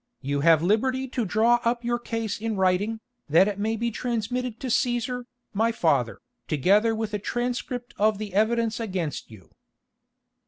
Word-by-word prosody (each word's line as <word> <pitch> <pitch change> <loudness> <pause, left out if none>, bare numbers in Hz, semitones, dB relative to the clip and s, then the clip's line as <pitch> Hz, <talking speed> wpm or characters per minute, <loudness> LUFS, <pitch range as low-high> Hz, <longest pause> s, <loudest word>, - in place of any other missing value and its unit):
You 140 +1 -1
have 160 +1 +5
liberty 260 +7 +1
to 245 -2 -1
draw 225 +5 +3
up 235 +1 0
your 240 0 0
case 225 -3 -3
in 225 -1 -2
writing, 190 +4 +1 0.3
that 170 +6 +5
it 205 -1 -3
may 220 +2 0
be 235 +1 -1
transmitted 240 +1 -3
to - - -5
Cæsar, 245 0 0 0.3
my 225 +3 +2
father, 140 - +1 0.3
together 205 - +3
with 220 -1 -3
a 210 - -1
transcript 245 +2 -3
of 215 0 +3
the 205 -2 -6
evidence 225 +2 +1
against 185 -9 -3
you." 105 -5 -15
220 Hz, 160 wpm, -25 LUFS, 195-240 Hz, 0.3 s, have